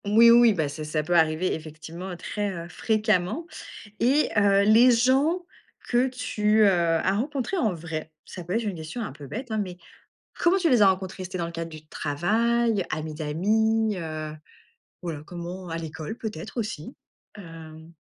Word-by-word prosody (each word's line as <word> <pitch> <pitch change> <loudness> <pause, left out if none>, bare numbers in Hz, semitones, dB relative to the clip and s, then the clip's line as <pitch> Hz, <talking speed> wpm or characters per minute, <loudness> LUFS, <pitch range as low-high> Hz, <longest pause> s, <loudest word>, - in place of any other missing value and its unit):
Oui, 225 +3 +7
oui, 235 -1 +7
bah, 160 -6 0
c'est 145 +2 -6
ça 155 0 -2
peut 175 +3 -1
arriver 160 +2 +2
effectivement 160 +4 -7
très, 205 +3 -3
heu, 170 -2 -6
fréquemment 215 - 0 0.5
et 270 +6 +3
heu, 200 -1 +4
les 225 +4 +6
gens 270 +9 +2 0.4
que 245 +2 +3
tu, 220 -4 +1
heu, - - +7
as 170 +1 +2
rencontré 270 - -2
en 225 - +2
vrai, 160 -1 -6
ça 180 - -8
peut 175 +2 -4
être 230 +2 0
une 205 -4 -3
question 160 +9 -6
un 205 - -5
peu 140 +1 -11
bête, 245 - -6
hein, 220 - 0
mais 180 -3 -4 0.6
comment 350 +3 +4
tu 345 -3 +2
les 245 -6 +5
as 195 - +7
rencontrés? 190 0 -3
C'était 185 0 -5
dans 170 - -1
le - - -7
cadre 165 0 -5
du 155 -1 -11
travail, 215 +8 0
amis 155 0 -4
d'amis, 215 +8 +1
heu? 155 -2 -5 0.7
Voilà 160 -5 -5
comment, 175 +1 -7
à 165 - -3
l'école 160 +4 -6
peut-être 215 0 -7
aussi? 210 -9 -4 0.4
Hem 165 -3 -11
185 Hz, 175 wpm, -25 LUFS, 160-225 Hz, 0.7 s, Oui